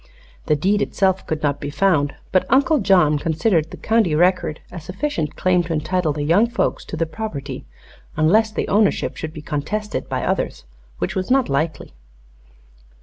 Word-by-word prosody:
The 150 - +3
deed 200 +7 +1
itself 190 -2 0
could 155 -1 -3
not 145 -1 0
be 145 - -4
found, 145 -2 +1 0.2
but 185 - +2
Uncle 280 +3 +4
John 180 -8 +4
considered 165 +1 +1
the - - -9
county 220 -8 +1
record 175 -2 +2
a 175 - -7
sufficient 185 - -3
claim 185 -1 +2
to 165 - -3
entitle 160 +1 0
the 145 0 -3
young 175 +10 +4
folks 240 - -1
to 160 - -6
the 165 - +1
property 155 -8 -6 0.5
unless 215 +9 +4
the - - -2
ownership 210 0 +1
should 160 - -5
be 155 -1 -10
contested 210 +9 -3
by - - -2
others, - - -2 0.3
which 90 - -2
was 185 -1 -2
not 265 0 +3
likely. 155 +3 -2
175 Hz, 170 wpm, -21 LUFS, 150-205 Hz, 0.5 s, Uncle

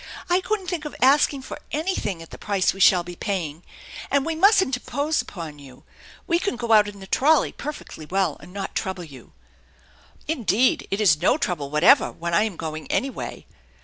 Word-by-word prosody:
I 360 +1 +4
couldn't 420 0 -2
think 350 -4 -3
of 300 - -6
asking 275 +1 +3
for - - -8
anything 290 - -2
at 165 - -16
the - - -10
price 200 -3 +1
we 195 - -11
shall 185 -2 +5
be 175 0 -9
paying. 170 -6 -3 0.5
And 280 0 +1
we 325 - -1
mustn't 380 - +4
impose 285 +5 -1
upon 160 -6 -8
you. 130 -3 -14 0.4
We 340 0 +1
can 360 - -2
go 235 -1 -3
out 210 -1 +6
in 205 -1 -9
the 190 - -9
trolley 290 +9 +3
perfectly 285 - -8
well, 190 -3 0
and - - -14
not 195 0 -5
trouble 190 -2 -3
you." 135 -7 -14 0.5
" - - -29
Indeed, 250 -5 +1
it 195 +2 -1
is 165 -7 +4
no - - +3
trouble 150 -6 -2
whatever 150 +4 +5
when 170 +1 -5
I 190 +6 +4
am 205 -6 -5
going 155 -1 -6
any 270 - 0
way." - - -7
200 Hz, 200 wpm, -23 LUFS, -, 0.5 s, out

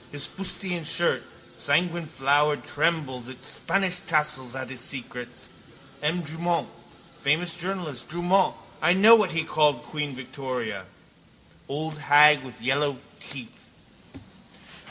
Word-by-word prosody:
His 145 -1 -1
fustian 185 -2 -4
shirt, 165 -4 +1 0.4
sanguineflowered, 150 -1 +1
trembles 145 -6 -1
its 130 -1 -9
Spanish 190 -2 0
tassels 150 -8 0
at 130 -1 -5
his 130 -2 -6
secrets. 125 -2 -5 0.5
M. 160 +4 0
Drumont, 165 +2 -1 0.5
famous 160 +4 +1
journalist, 175 -7 -4
Drumont, 175 +3 +2 0.4
know 215 +4 +9
what 210 -5 +2
he 165 0 +1
called 150 -2 +2
queen 150 -3 -4
Victoria? 125 -6 -5 0.8
Old 155 +2 -4
hag 150 0 +7
with 130 -4 -11
the - - -15
yellow 140 +1 +1 0.2
teeth. 130 -4 -9
150 Hz, 115 wpm, -26 LUFS, 130-170 Hz, 0.8 s, know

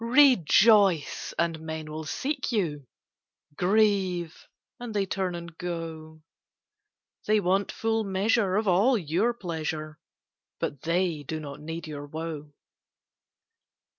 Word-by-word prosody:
Rejoice, 215 - +4
and 165 -1 0
men 160 -1 -6
will 155 +1 -5
seek 275 - -2
you; 155 - -1 0.7
Grieve, 190 -3 +1 0.3
and 240 -3 -6
they 200 -1 +2
turn 185 -2 -2
and 170 -1 -8
go; 160 -2 -6 1.0
They 215 0 +4
want 195 +1 +1
full 225 0 0
measure 195 0 +1
of 210 0 +1
all 205 +8 +4
your 180 +6 +1
pleasure, 155 -5 -4 0.6
But 140 - -3
they 170 -2 0
do 155 +3 -5
not 145 -1 -8
need 160 +2 -6
your 145 -2 -7
woe. 155 -1 -6
175 Hz, 115 wpm, -27 LUFS, 155-205 Hz, 1.0 s, Rejoice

